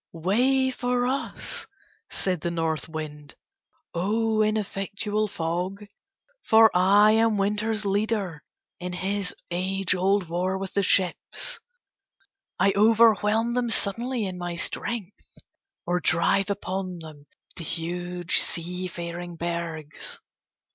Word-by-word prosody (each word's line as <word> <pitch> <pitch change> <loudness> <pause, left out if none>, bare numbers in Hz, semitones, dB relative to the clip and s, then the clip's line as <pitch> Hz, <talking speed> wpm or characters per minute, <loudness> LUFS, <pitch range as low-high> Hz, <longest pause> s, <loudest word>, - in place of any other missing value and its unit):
"Way 250 +10 +2
for 245 -1 0
us," 265 +2 -2 0.4
said 180 -4 -1
the 170 - -1
North 165 -1 -2
Wind, 150 -2 -7 0.6
"O 215 +5 +1
ineffectual 210 0 -1
fog, 180 +3 -3 0.6
for 220 0 +6
I 200 +4 +6
am 225 -1 +3
Winter's 210 +2 0
leader 200 -5 -1 0.4
in 180 0 -4
his 190 +1 -1 0.2
age 190 +2 +1
old 190 0 +1
war 180 +3 -1
with 190 0 -5
the 200 - +2
ships. 195 - 0 1.0
I 195 - +3
overwhelm 220 +1 +4
them 245 -1 0
suddenly 230 +2 +1
in 185 -1 -5
my 175 -1 -3
strength, 210 +3 -4 0.5
or 175 +1 +1
drive 180 +4 +2
upon 190 -2 -3
them 155 -3 -12 0.3
the 170 - -6
huge 175 +2 -1
seafaring 175 0 -3
bergs. 165 -2 -4
190 Hz, 110 wpm, -26 LUFS, 175-215 Hz, 1.0 s, for